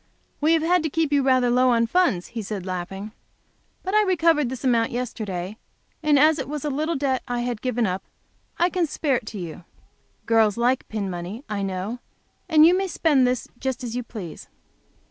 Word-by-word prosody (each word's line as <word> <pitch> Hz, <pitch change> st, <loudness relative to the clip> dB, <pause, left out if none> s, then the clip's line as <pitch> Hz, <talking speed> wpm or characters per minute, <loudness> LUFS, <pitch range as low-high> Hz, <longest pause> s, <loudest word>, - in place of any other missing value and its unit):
"We 310 Hz, +2 st, +3 dB
have 325 Hz, -1 st, +2 dB
had 355 Hz, +1 st, +3 dB
to 315 Hz, -, -1 dB
keep 315 Hz, 0 st, 0 dB
you 285 Hz, -, +4 dB
rather 255 Hz, -2 st, +3 dB
low 250 Hz, 0 st, +4 dB
in 230 Hz, 0 st, +3 dB
funds," 230 Hz, -, +1 dB
he 230 Hz, -, -5 dB
said 200 Hz, -2 st, -5 dB
laughing. 190 Hz, +3 st, -5 dB, 0.7 s
"But 380 Hz, -, -3 dB
I 425 Hz, -, +6 dB
recovered 330 Hz, -, +2 dB
this 260 Hz, 0 st, -6 dB
amount 235 Hz, -3 st, +2 dB
yesterday, 215 Hz, -5 st, -4 dB, 0.4 s
and 300 Hz, -2 st, +4 dB
as 310 Hz, +2 st, +5 dB
it 265 Hz, 0 st, -4 dB
was 300 Hz, -1 st, -4 dB
a 295 Hz, -, 0 dB
little 310 Hz, +4 st, -1 dB
debt 270 Hz, -2 st, 0 dB
I 245 Hz, -1 st, -1 dB
had 240 Hz, -3 st, -3 dB
given 245 Hz, -2 st, 0 dB
up, 185 Hz, -1 st, -2 dB, 0.6 s
I 350 Hz, +1 st, +2 dB
can 355 Hz, -3 st, +1 dB
spare 285 Hz, -3 st, 0 dB
it 230 Hz, -3 st, -9 dB
to 215 Hz, -, -6 dB
you. 170 Hz, -4 st, -6 dB, 0.6 s
For -, -, -40 dB
girls 225 Hz, -2 st, +3 dB
like 245 Hz, +2 st, +1 dB
pin 210 Hz, -3 st, -3 dB
money, 185 Hz, +7 st, -6 dB
I 210 Hz, -2 st, -3 dB
know, 195 Hz, +5 st, -3 dB, 0.5 s
and 310 Hz, 0 st, +7 dB
you 350 Hz, +2 st, +6 dB
may 385 Hz, +1 st, 0 dB
spend 295 Hz, -7 st, +3 dB
this 250 Hz, -1 st, -1 dB
just 265 Hz, -2 st, -3 dB
as 235 Hz, -1 st, -4 dB
you 250 Hz, -, -1 dB
please." 210 Hz, -9 st, -9 dB
250 Hz, 205 wpm, -24 LUFS, 215-300 Hz, 0.7 s, and